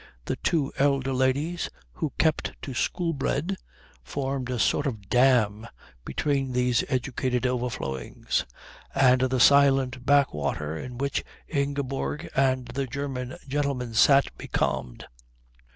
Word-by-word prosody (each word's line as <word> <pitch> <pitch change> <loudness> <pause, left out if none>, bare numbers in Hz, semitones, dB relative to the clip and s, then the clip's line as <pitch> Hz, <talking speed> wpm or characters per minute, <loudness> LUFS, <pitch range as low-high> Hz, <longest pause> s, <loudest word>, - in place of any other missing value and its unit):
The - - -2
two 150 -5 0
elder 135 -1 +2
ladies, 135 +7 0 0.2
who 145 - -3
kept 160 -1 +1
to 135 - -5
Shoolbred, 165 +4 -1 0.5
formed 135 - -3
a 125 - -1
sort 145 +5 +2
of 105 -7 -5
dam 115 -4 +3 0.4
between 135 -3 -1
these 125 -2 +2
educated 130 -1 -1
overflowings 120 - -2 0.5
and 130 -2 +5
the 130 0 +1
silent 135 -2 +5
back 140 +1 +4
water 75 +1 -2
in 125 +9 -7
which 140 +1 -1 0.2
Ingeborg 140 -1 -2
and 130 -1 +2
the 135 -1 -2
German 130 -1 -4
gentleman 135 -4 -1
sat 135 +5 +5
becalmed. 60 -2 -2
130 Hz, 120 wpm, -26 LUFS, 125-140 Hz, 0.5 s, and